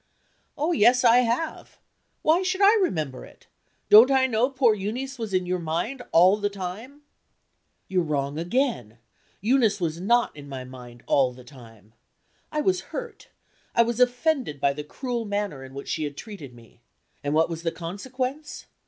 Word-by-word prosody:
"Oh, 305 Hz, +4 st, 0 dB
yes, 250 Hz, -4 st, +4 dB
I 235 Hz, 0 st, +6 dB
have. 250 Hz, +6 st, -1 dB, 0.5 s
Why 320 Hz, +4 st, +4 dB
should 375 Hz, 0 st, -1 dB
I 400 Hz, +2 st, +7 dB
remember 155 Hz, -, -2 dB
it? -, -, -17 dB, 0.4 s
Don't 220 Hz, +5 st, +8 dB
I 265 Hz, -1 st, +4 dB
know 245 Hz, 0 st, +1 dB
poor 260 Hz, -4 st, +3 dB
Euneece 240 Hz, +7 st, -4 dB
was 220 Hz, -3 st, -4 dB
in 185 Hz, -1 st, 0 dB
your 180 Hz, 0 st, -1 dB
mind, 170 Hz, +11 st, -3 dB
all 185 Hz, +5 st, +6 dB
the 205 Hz, -1 st, -1 dB
time?" 205 Hz, +9 st, -8 dB, 0.8 s
"You're 185 Hz, -1 st, +1 dB
wrong 145 Hz, -2 st, -2 dB
again! 175 Hz, -, -1 dB, 0.4 s
Eunice 220 Hz, -2 st, +2 dB
was 165 Hz, -1 st, -2 dB
not 235 Hz, +2 st, +2 dB
in 145 Hz, -1 st, -11 dB
my 130 Hz, -2 st, -6 dB
mind 125 Hz, -2 st, -12 dB
all 130 Hz, -3 st, +2 dB
the 125 Hz, 0 st, -14 dB
time. 115 Hz, -5 st, -16 dB, 0.6 s
I 305 Hz, -, -1 dB
was 370 Hz, +3 st, +1 dB
hurt 480 Hz, -2 st, -7 dB, 0.5 s
I 235 Hz, -, +6 dB
was 235 Hz, 0 st, -3 dB
offended 250 Hz, -, +1 dB
by 140 Hz, 0 st, +2 dB
the 150 Hz, +1 st, -6 dB
cruel 240 Hz, -, -4 dB
manner 205 Hz, -9 st, -3 dB
in 135 Hz, 0 st, -12 dB
which 140 Hz, -, -7 dB
she 155 Hz, -, -2 dB
had 145 Hz, -1 st, -7 dB
treated 155 Hz, -, -9 dB
me. 115 Hz, 0 st, -19 dB, 0.4 s
And 145 Hz, +1 st, -1 dB
what 160 Hz, +1 st, +4 dB
was 165 Hz, -1 st, -6 dB
the 165 Hz, -1 st, -1 dB
consequence? 255 Hz, -, -5 dB
205 Hz, 170 wpm, -25 LUFS, -, 0.8 s, Don't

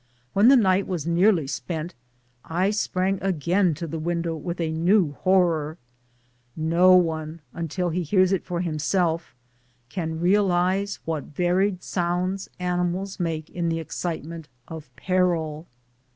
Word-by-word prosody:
When 200 Hz, +4 st, +5 dB
the 270 Hz, +1 st, +8 dB
night 190 Hz, -3 st, +3 dB
was 175 Hz, -6 st, -3 dB
nearly 170 Hz, -1 st, +3 dB
spent 155 Hz, +6 st, -4 dB, 0.5 s
I 180 Hz, +5 st, 0 dB
sprang 195 Hz, -2 st, -1 dB
again 180 Hz, -1 st, +1 dB
to 170 Hz, -, -5 dB
the 160 Hz, 0 st, -5 dB
window 170 Hz, 0 st, -2 dB
with 170 Hz, +3 st, -5 dB
a 165 Hz, -2 st, -1 dB
new 170 Hz, +1 st, +3 dB
horror, 165 Hz, -2 st, +1 dB, 0.8 s
for -, -, -10 dB
no 170 Hz, +4 st, +5 dB
one, 160 Hz, -2 st, 0 dB
until 170 Hz, +2 st, -2 dB
he 180 Hz, +3 st, -1 dB
hears 185 Hz, +3 st, +3 dB
it 195 Hz, -, 0 dB
for 175 Hz, -1 st, -3 dB
himself, 165 Hz, -1 st, -1 dB, 0.5 s
can 160 Hz, 0 st, -3 dB
realize 190 Hz, +1 st, +2 dB
what 160 Hz, -3 st, -3 dB
varied 180 Hz, +4 st, 0 dB
sounds 180 Hz, +2 st, -2 dB
animals 180 Hz, +2 st, -2 dB
make 165 Hz, -2 st, -3 dB
in 170 Hz, -1 st, -1 dB
the 165 Hz, -, 0 dB
excitement 165 Hz, -1 st, -5 dB, 0.2 s
of 160 Hz, -5 st, -9 dB
peril. 170 Hz, -4 st, 0 dB
175 Hz, 135 wpm, -24 LUFS, 160-185 Hz, 0.8 s, the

